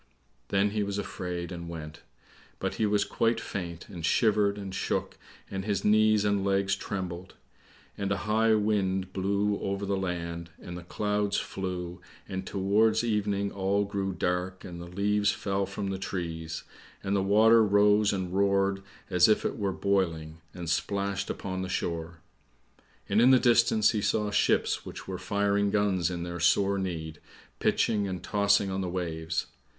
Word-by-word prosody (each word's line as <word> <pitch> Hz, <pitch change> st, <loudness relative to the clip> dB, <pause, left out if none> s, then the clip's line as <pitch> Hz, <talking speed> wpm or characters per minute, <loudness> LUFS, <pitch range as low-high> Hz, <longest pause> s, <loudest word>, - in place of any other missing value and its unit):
Then 100 Hz, +1 st, +2 dB
he 105 Hz, 0 st, -1 dB
was 100 Hz, 0 st, -2 dB
afraid 90 Hz, -3 st, -4 dB
and 85 Hz, -1 st, -6 dB
went; 80 Hz, -2 st, -8 dB, 0.6 s
but -, -, -2 dB
he 110 Hz, -, +3 dB
was 105 Hz, 0 st, +2 dB
quite 115 Hz, 0 st, +1 dB
faint, 85 Hz, -6 st, -6 dB
and 90 Hz, -5 st, -8 dB
shivered 105 Hz, +2 st, +3 dB
and 100 Hz, -2 st, -6 dB
shook, -, -, -2 dB, 0.4 s
and 95 Hz, 0 st, -3 dB
his 100 Hz, -1 st, -1 dB
knees 110 Hz, 0 st, +4 dB
and 100 Hz, -1 st, +1 dB
legs 100 Hz, 0 st, +1 dB
trembled. 95 Hz, -2 st, -5 dB, 0.6 s
And 100 Hz, -1 st, -1 dB
a 100 Hz, -, +1 dB
high 110 Hz, +1 st, +3 dB
wind 95 Hz, -3 st, 0 dB
blew 100 Hz, +2 st, 0 dB
over 100 Hz, +1 st, -2 dB
the 100 Hz, 0 st, 0 dB
land, 85 Hz, -2 st, -4 dB
and 90 Hz, -, -8 dB
the 90 Hz, -, -6 dB
clouds 105 Hz, +3 st, -1 dB
flew, 90 Hz, -2 st, -4 dB, 0.3 s
and 95 Hz, 0 st, -5 dB
towards 105 Hz, +4 st, +2 dB
evening 105 Hz, -3 st, 0 dB
all 100 Hz, +1 st, 0 dB
grew 100 Hz, -1 st, -2 dB
dark, 90 Hz, +1 st, -2 dB
and 85 Hz, -2 st, -8 dB
the 85 Hz, -, -8 dB
leaves 100 Hz, +3 st, +1 dB
fell 100 Hz, -1 st, -2 dB
from 100 Hz, 0 st, -4 dB
the 95 Hz, -, -3 dB
trees, 80 Hz, -4 st, -4 dB, 0.4 s
and 100 Hz, +1 st, 0 dB
the 100 Hz, -, +2 dB
water 110 Hz, +3 st, +5 dB
rose 105 Hz, 0 st, +4 dB
and 95 Hz, -2 st, -3 dB
roared 100 Hz, 0 st, +2 dB, 0.3 s
as 90 Hz, +3 st, +6 dB
if 110 Hz, -, +3 dB
it -, -, -2 dB
were 100 Hz, -2 st, 0 dB
boiling, 85 Hz, -5 st, -1 dB
and 85 Hz, 0 st, -7 dB
splashed 100 Hz, +3 st, -1 dB
upon 95 Hz, -1 st, -4 dB
the 95 Hz, -, -4 dB
shore. 85 Hz, -1 st, -3 dB, 0.9 s
And 105 Hz, +3 st, +3 dB
in 125 Hz, -, +7 dB
the 130 Hz, -, +8 dB
distance 115 Hz, -3 st, +4 dB
he 110 Hz, -3 st, -1 dB
saw 105 Hz, 0 st, 0 dB
ships -, -, +2 dB
which -, -, -9 dB
were -, -, -4 dB
firing 100 Hz, 0 st, +1 dB
guns 100 Hz, -4 st, +1 dB
in 85 Hz, -1 st, -4 dB
their 85 Hz, 0 st, -5 dB
sore 100 Hz, +3 st, +3 dB
need, 80 Hz, -5 st, -4 dB, 0.4 s
pitching 105 Hz, -3 st, +1 dB
and 90 Hz, -2 st, -5 dB
tossing 100 Hz, -1 st, +2 dB
on 95 Hz, 0 st, -2 dB
the 90 Hz, -, -2 dB
waves. 80 Hz, -3 st, -2 dB
100 Hz, 165 wpm, -28 LUFS, 90-105 Hz, 0.9 s, the